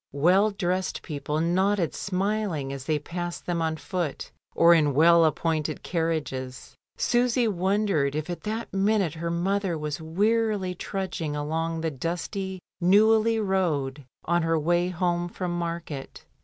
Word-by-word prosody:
Well 185 +8 +4
dressed 185 -2 -2
people 150 -1 -3
nodded 180 +1 +1
smiling 190 -7 -2
as 135 -1 -7
they 155 0 +1
passed 175 +3 -5
them 175 -1 -1
on 160 -1 -1
foot 175 -2 -4 0.2
or 170 +1 +7
in 150 -5 +3
well 170 +2 +6
appointed 155 -1 -1
carriages. 155 -7 -3 0.2
Susy 245 0 +2
wondered 190 -7 +1
if 155 0 -2
at 175 -1 -5
that 220 0 -4
minute 195 -3 +2
her 170 +1 -4
mother 185 +1 0
was 150 0 -4
wearily 205 +3 +1
trudging 175 -5 -4
along 160 +2 -2
the 160 -1 -1
dusty 175 +6 -4 0.2
Neuilly 220 +4 +4
road 155 -9 0 0.2
on 175 +1 +2
her 165 0 +1
wiy 175 +3 +1
home 175 0 -1
from 175 -1 -3
market. 170 -5 -5
175 Hz, 140 wpm, -26 LUFS, 160-195 Hz, 0.2 s, or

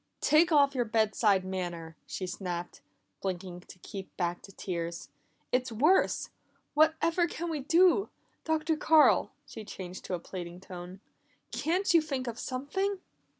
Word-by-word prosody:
"Take 330 +3 +4
off 285 -2 +5
your 245 -3 0
bed 220 -1 +1
side 200 -4 +3
manner!" 175 -4 -4
she 185 - -4
snapped, 180 -1 -5 0.4
blinking 185 -1 -4
to - - -12
keep 195 -2 -8
back 175 -1 -1
the 195 - -13
tears. 170 -3 -5 0.4
"It's 250 -1 +1
worse! 300 - +2 0.4
What 310 +1 +5
ever 340 +1 +3
can 340 0 -4
we 310 - -2
do? 350 +7 +4 0.3
Dr. 320 0 +1
Carl," 315 0 +5 0.2
she 220 - -9
changed 185 -3 -8
to 185 - -2
a - - -5
pleading 175 0 -7
tone, 185 0 -9 0.5
"can't 360 +4 +1
you 335 - +7
think 275 -5 -3
of 235 -1 -5
something?" 380 +10 -2
225 Hz, 150 wpm, -30 LUFS, -, 0.5 s, you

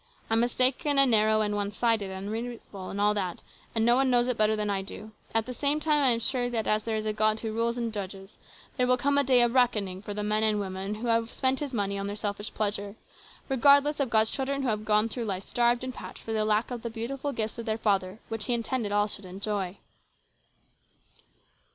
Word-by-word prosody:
I'm 225 - +4
mistaken, 255 +4 +2
and 275 -2 +5
narrow, 215 0 +4
and 210 -1 0
one 205 -1 -1
sided, 215 -1 0
and 190 +1 -6
unreasonable, 225 -4 -6
and 200 - -5
all 210 +1 +3
that, 185 -4 -3 0.3
and 225 0 +2
no 240 +1 +5
one 265 +1 +2
knows 245 -1 +3
it 250 - +1
better 215 0 +3
than 210 -1 -1
I 200 -1 0
do. 210 +2 -9 0.2
All 225 - +3
the 250 - -6
same, 285 +4 +1
I 295 -4 +4
am 230 -1 +3
sure 245 +1 0
that, 230 -2 -1
as 215 0 +2
there 225 0 -2
is 215 - -3
a 215 - 0
God 215 +1 +1
who 225 - -3
rules 230 +1 0
and 230 -2 -2
judges, 195 -1 -7 0.4
there 250 -1 +2
will 250 0 +3
come 285 +3 +2
a - - +3
day 255 -2 +5
of 240 0 +1
reckoning 210 -7 +1
for 205 -1 -6
the 210 - -2
men 210 +1 +1
and 215 -1 +2
women 195 +1 -4
who 230 +3 -5
have 230 0 +1
spent 265 0 0
His 290 -3 -4
money 200 -4 -1
on 195 - -3
their 205 - -4
selfish 205 0 -4
pleasures, 205 -1 -2 0.5
regardless 285 +2 +4
of 275 -3 0
God's 220 -1 +3
children 275 0 -1
who 260 - 0
have 215 -1 -2
gone 210 +1 +3
through 230 +1 -4
life 195 -2 -3
starved 240 +2 +1
and 255 0 -4
parched - - -10
for 225 - -4
the 215 -1 +1
lack 215 +3 +1
of 245 -2 -4
the 235 - -4
beautiful 255 +5 -4
gifts 220 -3 -3
of 230 - -6
their 220 0 0
Father 195 -3 0
which 225 -1 -4
He 245 - +2
intended 230 -2 -2
all 205 0 +3
should 205 -1 -5
enjoy." 195 0 -4
220 Hz, 235 wpm, -28 LUFS, 205-245 Hz, 0.5 s, and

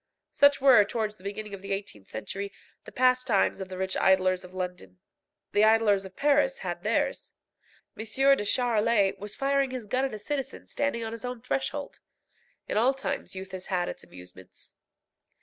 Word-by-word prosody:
Such 285 0 +5
were, 260 -6 +7
towards 215 0 -3
the 185 - -20
beginning 205 +1 -6
of 195 - -7
the 195 0 -3
eighteenth 195 - -6
century, 200 - -5 0.3
the - - -10
pastimes 255 -6 +2
of 190 - -6
the 185 - -7
rich 190 0 -1
idlers 185 -1 +3
of 180 - -12
London. 180 - -6 0.5
The 205 - +3
idlers 215 -3 +4
of 190 0 -11
Paris 295 - +2
had - - -3
theirs. - - -1 0.6
M. - - -6 0.3
de 205 - -3
Charolais 220 -3 +2
was 205 0 -5
firing 275 0 +1
his 255 -3 -5
gun 255 +6 0
at 270 - -4
a - - -5
citizen 270 +5 -4
standing 280 -5 -2
on 225 - -4
his 230 +1 -7
own 250 -1 -4
threshold. 270 +4 -3 0.7
In - - -1
all 255 +5 +3
times 270 - -4
youth 190 0 -7
has 185 -1 -7
had 180 -2 0
its - - -6
amusements. 90 0 -13
210 Hz, 180 wpm, -28 LUFS, 190-255 Hz, 0.7 s, were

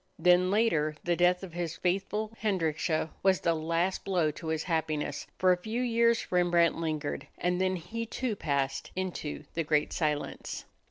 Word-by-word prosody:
Then 180 +1 +5
later 170 -8 +2
the 175 0 +1
death 180 +2 +3
of 180 -4 -8
his 170 -2 -3
faithful 205 +4 -1
Hendrickje 160 -5 0
was 190 -1 +3
the 170 - +2
last 165 +3 0
blow 175 -6 +1
to 160 +2 -9
his 160 0 -1
happiness. 155 -4 -2
For 185 0 +4
a 180 - +3
few 225 +5 -2
years 235 -1 +2
Rembrandt 175 -2 +3
lingered, 155 -3 -3
and 180 +1 0
then 185 0 +2
he 220 +7 -5
too 245 -1 -2
passed 140 -6 -1
into 185 -5 -4
the 165 - 0
great 150 -1 +1
silence. 150 -3 -2
175 Hz, 165 wpm, -30 LUFS, 160-190 Hz, -, Then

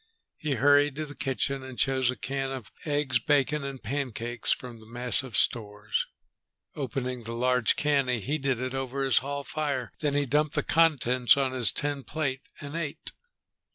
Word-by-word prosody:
He 150 -2 -1
hurried 145 +2 +4
to 155 +1 -3
the 145 - -9
kitchen 135 0 -1
and 130 -2 -9
chose 130 -2 +2
a 125 - 0
can 135 +1 -3
of 130 -4 -6
eggs 145 -4 +1
bacon 145 +2 +2
and 135 -2 -6
pancakes 120 -2 -1
from 120 -2 -3
the 110 - -15
massive 125 0 +1
stores. 105 -1 +1 0.7
Opening 130 -2 -3
the 115 +1 -4
large 125 -1 +2
can, 145 -3 +2
he 125 -2 +1
heated 135 +2 -1
it 130 0 -3
over 135 +1 -2
his 135 -4 +4
hall 140 +2 -4
fire. 140 -5 -2
Then 145 -2 0
he 145 0 +2
dumped 150 +3 +1
the - - +1
contents 130 -7 +4
on 135 -2 +1
his 125 -6 +4
tin 145 -2 -2
plate 140 -3 -2 0.2
and 145 +2 -6
ate. 165 -2 -3
135 Hz, 175 wpm, -28 LUFS, 125-145 Hz, 0.7 s, hurried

